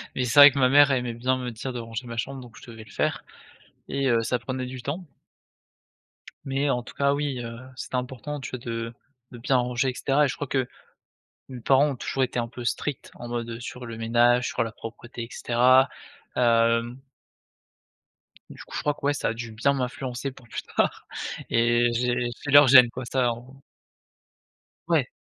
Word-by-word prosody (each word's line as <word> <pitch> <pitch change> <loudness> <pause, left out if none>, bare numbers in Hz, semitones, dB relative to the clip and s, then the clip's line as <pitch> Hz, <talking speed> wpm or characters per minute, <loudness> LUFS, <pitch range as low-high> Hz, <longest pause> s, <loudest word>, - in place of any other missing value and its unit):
Mais 125 - 0
c'est 125 +4 +3
vrai 145 0 +11
que 140 - -3
ma 130 -1 +4
mère 145 0 +6
aimait 125 -2 0
bien 130 +2 0
me 125 -1 -4
dire 125 +3 -6
de 120 - -4
ranger 115 +2 -6
ma 115 0 -7
chambre, 135 +3 -4
donc 120 -2 -13
je - - -13
devais 110 -1 -10
le - - -16
faire, - - -1 0.7
et 135 -1 0
heu, 115 -1 +3
ça 125 +2 0
prenait 130 +1 -4
du 125 -1 -8
temps 160 +8 -4 1.4
mais 135 +1 0
en 125 -1 0
tout - - -12
cas, 140 0 +2
oui, 140 -3 -2
heu, 115 0 -7 0.2
c'était 130 - -5
important, 130 +3 -4
tu - - -7
vois, 130 - -4
de 115 -1 -4 0.4
de 125 - -10
bien 130 +3 +1
ranger, 125 +1 0
et - - -8
cetera. 140 +3 +2
Et - - +2
je - - -3
crois 145 - -4
que 130 -2 0 0.8
mes 125 -2 -8
parents 140 +4 +4
ont - - -3
toujours 130 +2 -1
été 125 - -4
un 115 - -3
peu 120 0 -9
stricts 145 +3 -3
en 120 - -9
mode, 120 -1 -3
heu, 115 +1 -6
sur 125 0 -7
le 115 -1 -7
ménage, 120 +2 +3
sur - - -1
la 115 - -6
propreté, 120 +1 -9
et 115 - -7
cetera, 130 +2 +4 0.5
hem 115 +1 +2 1.5
du - - -10
coup, - - -13
je - - -2
crois 150 - 0
que, - - -19
ouais, 145 - +3
ça - - -1
a 115 - -2
dû 115 -1 -7
bien 140 +6 +1
m'influencer 125 0 -3
pour 125 -3 -17
plus - - -5
tard - - 0 0.4
et 120 +1 +3
j'ai 125 0 0
j'ai 145 - -3
leurs 145 +1 +8
gênes, 125 -2 +9
quoi, 130 +1 -6
ça 125 -1 +1
en 125 +4 -12 1.3
Ouais. - - +2
125 Hz, 210 wpm, -25 LUFS, 120-135 Hz, 1.5 s, vrai